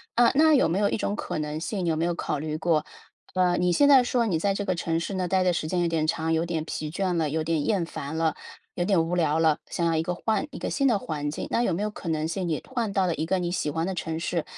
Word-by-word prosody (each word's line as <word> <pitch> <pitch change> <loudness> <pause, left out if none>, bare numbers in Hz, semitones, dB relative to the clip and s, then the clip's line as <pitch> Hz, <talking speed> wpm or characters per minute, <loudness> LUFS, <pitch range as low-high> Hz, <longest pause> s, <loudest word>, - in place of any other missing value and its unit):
呃， 240 0 +5
那 310 +2 +5
有 260 - +4
没 170 +4 0
有 205 -1 +3
一 - - -1
种 205 - -1
可 - - -4
能 150 0 -3
性 185 +2 -3
有 165 -2 +1
没 160 - -1
有 175 0 0
考 150 - -2
虑 155 +1 -3
过， 155 -2 +1 0.5
呃， 180 -1 +3
你 180 0 +2
现 285 +11 +4
在 270 -3 +7
说 245 -1 +1
你 180 -7 0
在 195 +3 +1
这 205 - -3
个 185 - +1
城 165 -1 -1
市 170 +4 -4
呢， 185 -1 -1
待 185 +1 +2
的 180 -1 +2
时 155 - -2
间 180 +2 0
有 175 - +2
点 160 -2 0
长， 160 +1 0
有 160 0 +2
点 160 -2 -2
疲 155 -1 -4
倦 185 +3 -1
了， 160 -3 +1
有 155 +2 -1
点 160 -2 0
厌 195 -6 +1
烦 160 -1 -6
了， 160 -1 +1 0.4
有 175 - -1
点 175 -3 +2
无 175 - -1
聊 160 -3 +2
了， 160 -2 +3
想 170 - -1
要 165 -1 +2
一 160 - +2
个 180 - -2
换 220 +8 -1
一 - - -8
个 - - -3
新 275 -1 +1
的 220 -4 +2
环 150 -4 -3
境， - - -5
那 - - +2
有 190 - +1
没 175 - -2
有 210 - 0
可 185 - -7
能 155 -1 0
性 180 +2 -3
你 155 - -1
换 235 -5 -2
到 195 -1 +1
了 170 - +1
一 160 - -2
个 190 +3 0
你 175 -1 -1
喜 175 - -1
欢 165 +3 -1
的 190 - -2
城 160 -1 -3
市， 170 -1 -1
170 Hz, 330 characters per minute, -26 LUFS, 160-195 Hz, 0.5 s, 在